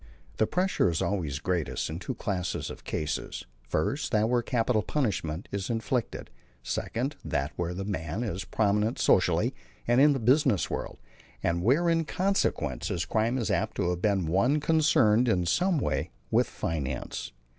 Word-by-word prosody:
The 110 - +2
pressure 180 - +1
is 85 - -1
always 80 -9 -1
greatest 85 0 -1
in 80 +2 -5
two 130 +6 -4
classes 95 -5 -3
of - - -11
cases: 75 -1 -3 0.2
first, 80 - -1
that 110 -2 +3
where 120 0 +2
capital 115 -2 +1
punishment 100 - -2
is 100 -1 -3
inflicted; 115 - -2 0.3
second, 125 - -2
that 70 +2 -1
where 85 0 -2
the 95 +1 -4
man 95 +1 -3
is 95 -4 -3
prominent 105 +3 +1
socially - - +3 0.3
and 120 +2 +4
in 145 0 +6
the 135 - -1
business 130 - +3
world, - - -4 0.5
and 85 +1 +1
where 140 - +3
in 165 -1 +2
consequence 150 - 0
his 85 - -1
crime 115 +3 +1
is 115 -4 -1
apt 100 +3 -1
to 90 -3 +1
have 90 0 -3
been 100 -4 +2
one 100 - +2
concerned 145 -7 +4
in 90 -6 +2
some 175 - +2
way 75 - -1 0.2
with - - +3
finance. 70 -6 -4
105 Hz, 165 wpm, -28 LUFS, 85-125 Hz, 0.5 s, in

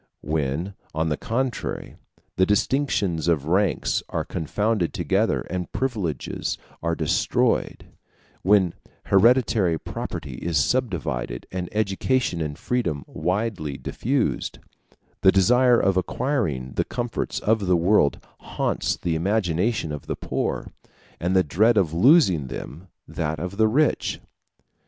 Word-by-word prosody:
When, 75 +4 -2 0.2
on 80 +1 0
the 75 - +1
contrary, 120 - -3 0.4
the 95 - +3
distinctions 105 - +1
of 80 -5 +2
ranks 95 +3 +1
are - - -2
confounded 105 +3 -1
together - - +1
and 90 -1 -5
privileges 105 - -2 0.2
are 85 0 0
destroyed 105 +9 0 0.6
when 95 -3 +4 0.3
hereditary 105 -4 +4
property 70 -4 -6
is 85 -2 0
subdivided, 75 - -1
and 90 -1 -4
education 105 -1 0
and 75 -1 -3
freedom 85 - -1
widely 90 -6 -2
diffused, 130 +2 -1 0.6
the 95 - +7
desire 120 +6 +4
of 95 -1 +2
acquiring 90 - -1
the - - +3
comforts 120 -1 -3
of 105 -2 +1
the 90 -1 +4
world 85 -3 +3 0.2
haunts - - -1
the 85 - -2
imagination 90 +1 0
of 75 - -7
the - - -2
poor, - - -2 0.5
and 90 +2 0
the 95 - +5
dread 110 +9 +3
of 85 -6 +2
losing 95 - +5
them 75 +7 -8 0.2
that 80 0 -3
of 90 +5 -5
the 110 0 +4
rich. 145 +7 +1
95 Hz, 125 wpm, -24 LUFS, 80-115 Hz, 0.6 s, the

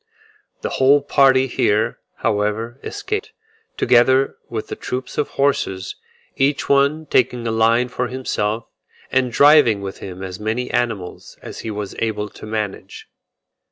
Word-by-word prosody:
The - - -2
whole 140 +2 +5
party 135 -2 +4
here, 110 -4 0 0.3
however, 105 +4 -1
escaped, 415 +1 -4 0.4
together 130 +2 +4
with 110 -2 -4
the - - -6
troop 130 +1 -5
of 150 - 0
horses; 95 -9 -1 0.4
each 140 +1 +1
one 140 +3 +2
taking 125 -3 +1
a 115 - 0
line 115 +2 +3
for 125 0 -3
himself, 115 -3 -2 0.5
and 130 -1 +1
driving 140 -6 +6
with 100 -1 -7
him 95 0 -8
as 95 0 -6
many 110 +4 -2
animals 115 -7 -3
as - - -8
he 115 - -5
was 105 -2 -5
able 105 -2 -2
to 105 - -11
manage. 105 -3 -5
120 Hz, 140 wpm, -20 LUFS, 105-130 Hz, 0.5 s, driving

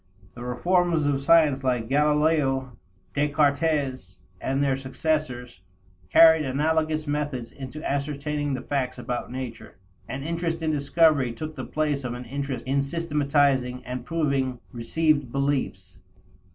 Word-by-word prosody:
The 120 - -9
reformers 170 +5 +1
of 140 -1 +1
science 145 -3 +4
like 125 -3 0
Galileo, 145 -2 +2 0.4
Descartes, 140 - 0 0.2
and 135 +1 0
their 135 -2 +2
successors, 130 - -3 0.5
carried 160 -1 +7
analogous 155 +3 0
methods 145 -5 -3
into 140 +3 -7
ascertaining 145 0 -2
the 130 - -6
facts 130 -3 -2
about 125 0 -4
nature. 125 -2 -7 0.3
An 135 +1 -5
interest 165 +1 -2
in 160 - +1
discovery 145 -2 +3
took 155 +5 -6
the - - -5
place 150 -2 -1
of 120 -1 -3
an 125 0 -7
interest 135 -1 -4
in 135 +2 +1
systematizing 140 -4 +1
and 125 0 -5
"proving" 135 -4 -1
received 145 +2 0
beliefs. 135 -9 -2
140 Hz, 125 wpm, -25 LUFS, 130-155 Hz, 0.5 s, carried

